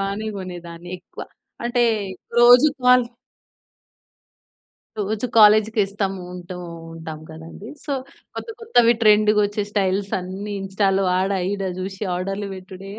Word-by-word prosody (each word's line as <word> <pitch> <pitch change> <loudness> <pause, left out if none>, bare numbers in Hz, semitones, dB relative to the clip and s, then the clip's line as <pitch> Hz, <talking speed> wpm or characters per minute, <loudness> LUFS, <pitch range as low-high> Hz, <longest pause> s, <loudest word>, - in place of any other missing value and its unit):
బానే 200 +2 -3
కొనేదాన్ని, 175 -2 -8
ఎక్కువ. 175 - -11 0.4
అంటే 240 0 +2 0.5
రోజు 245 +5 +8
కాల్ 250 -1 +6 1.9
రోజు 210 +3 -1
కాలేజ్‌కి 215 0 +6
‌ఇస్తాము 195 -1 -3
ఉంటూ 180 0 -8 0.4
ఉంటాం 160 -1 -8
కదండీ, 165 +7 -10 0.2
సో 285 - -3 0.4
కొత్త - - -7
కొత్తవి 245 - +4
ట్రెండ్‌గా 210 0 +5
వచ్చే 205 +1 -2
స్టైల్స్ 195 -1 0
అన్ని 190 +3 -6
ఇన్‌స్టాలో 195 0 +1
ఆడ, 190 +1 0 0.2
ఈడ 200 -1 -3 0.2
చూసి 190 +2 -6
ఆర్డర్‌లు 195 +2 -3
పెట్టుడే 190 +1 -10
200 Hz, 115 wpm, -22 LUFS, 185-215 Hz, 1.9 s, రోజు